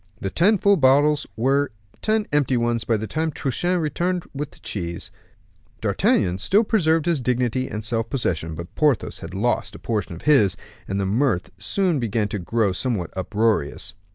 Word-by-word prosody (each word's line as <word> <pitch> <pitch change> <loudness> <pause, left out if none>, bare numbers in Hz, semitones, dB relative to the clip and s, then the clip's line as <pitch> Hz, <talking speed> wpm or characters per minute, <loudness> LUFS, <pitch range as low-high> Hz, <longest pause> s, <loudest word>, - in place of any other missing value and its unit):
The 95 - -3
ten 205 +5 +4
full 200 +1 +4
bottles 145 +1 +4
were 135 +4 +2 0.3
ten 215 -1 +1
empty 140 -4 +2
ones 120 -1 0
by 115 - +2
the 110 - -4
time 160 +7 -1
Truchen 175 +7 -1
returned 175 +3 -1
with 145 +1 -4
the - - -19
cheese. 85 -4 -5 0.7
D'Artagnan 90 +1 +1
still 200 - +3
preserved 165 -8 +2
his 170 -5 +1
dignity 125 +1 0
and 105 0 -5
self 115 +1 -1
possession, 80 - -2
but 85 +2 -8
Porthos 150 -7 +1
had - - -8
lost 120 +5 0
a - - -7
portion 105 -7 -3
of 85 - -12
his; 105 -11 +4 0.3
and 95 +1 -2
the 100 - 0
mirth 110 -1 0
soon 185 -7 0
began 110 -2 0
to 100 - -3
grow 105 +3 +1
somewhat 95 -3 -2
uproarious. 100 -5 0
125 Hz, 175 wpm, -23 LUFS, 105-150 Hz, 0.7 s, ten